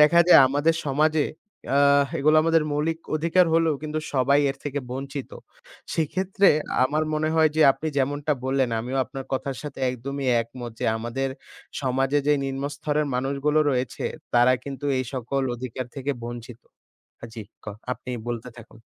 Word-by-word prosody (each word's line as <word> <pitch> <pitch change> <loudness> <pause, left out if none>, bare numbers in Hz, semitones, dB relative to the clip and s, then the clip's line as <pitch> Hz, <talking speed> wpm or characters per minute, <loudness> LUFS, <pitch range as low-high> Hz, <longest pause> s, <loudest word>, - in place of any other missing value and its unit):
দেখা 150 +3 +7
যায় 165 - +9
আমাদের 145 +4 +2
সমাজে 150 +2 +2 0.5
আ - - +5 0.4
এগুলো 155 +3 +4
আমাদের 165 -1 +3
মৌলিক 160 +3 -1 0.2
অধিকার 165 +4 +3
হলেও 165 -2 +3
কিন্তু 155 0 -3 0.2
সবাই 140 +2 +4
এর 135 - -7
থেকে 145 0 -2
বঞ্চিত। 135 +1 -5 0.6
সেক্ষেত্রে 190 +5 +2 0.4
আমার 150 +4 0
মনে 155 0 0
হয়, 160 -1 +5
যে 160 - +5
আপনি 160 - -7
যেমনটা 145 +3 0
বললেন 130 -2 +1
আমিও 125 +3 -4
আপনার 135 0 -8
কথার 135 0 -2
সাথে 145 -2 -8
একদমই 135 +2 -5 0.2
একমত 120 +1 -8
যে - - -1
আমাদের 120 +4 -3 0.5
সমাজে 135 +2 +1
যে 150 - +5
নিম্নস্তরের 145 +2 -2
মানুষগুলো 140 +4 +1
রয়েছে, 125 0 -2 0.3
তারা 120 +1 +6
কিন্তু 140 0 -7
এই 130 - -1
সকল 130 +2 -2
অধিকার 125 +1 -5
থেকে 135 +1 -2
বঞ্চিত 120 0 -8 0.6
হ্যাঁ 115 - -9
জি, 115 - -6 0.2
ক - - -19 0.3
আপনি 125 - -7 0.2
বলতে 120 +1 -4
থাকুন। 110 -1 -14
140 Hz, 155 wpm, -24 LUFS, 130-150 Hz, 0.6 s, যায়